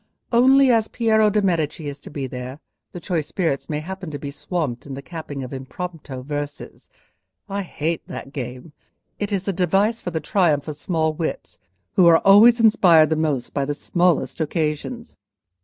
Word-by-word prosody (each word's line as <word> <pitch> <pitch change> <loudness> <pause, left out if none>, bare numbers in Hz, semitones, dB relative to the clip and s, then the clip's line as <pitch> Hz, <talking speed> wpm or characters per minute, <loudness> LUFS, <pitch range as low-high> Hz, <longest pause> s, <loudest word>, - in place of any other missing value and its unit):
Only, 260 +2 +5
as 225 -2 +2
Piero 220 -2 +2
de' 210 0 +1
Medici 165 -3 -1
is 140 0 -6
to - - -11
be 140 -2 -4
there, 130 +2 -7 0.3
the 175 - -7
choice 170 -4 -2
spirits 165 -5 -2
may 150 -1 -2
happen 190 +1 -7
to 145 - -5
be 140 0 -6
swamped 145 -5 -4
in 135 - -6
the 140 - -7
capping 150 -5 -7
of 125 - -8
impromptu 135 0 -7
verses. 145 +1 -6 0.6
I 200 0 -3
hate 165 -3 -3
that 135 - -8
game; 125 +3 -7 0.5
it 205 0 -3
is 195 -1 -2
a 195 - 0
device 195 +6 +1
for - - -4
the 160 -2 -2
triumph 155 -3 +1
of 155 - -4
small 160 0 -1
wits, 155 - -5 0.3
who 180 - +5
are 165 -1 +8
always 220 +5 +7
inspired 180 -9 +5
the - - +3
most 150 -6 -1
by 140 - 0
the 145 +1 -2
smallest 175 +1 0
occasions." 160 - -3
160 Hz, 180 wpm, -22 LUFS, 145-195 Hz, 0.6 s, are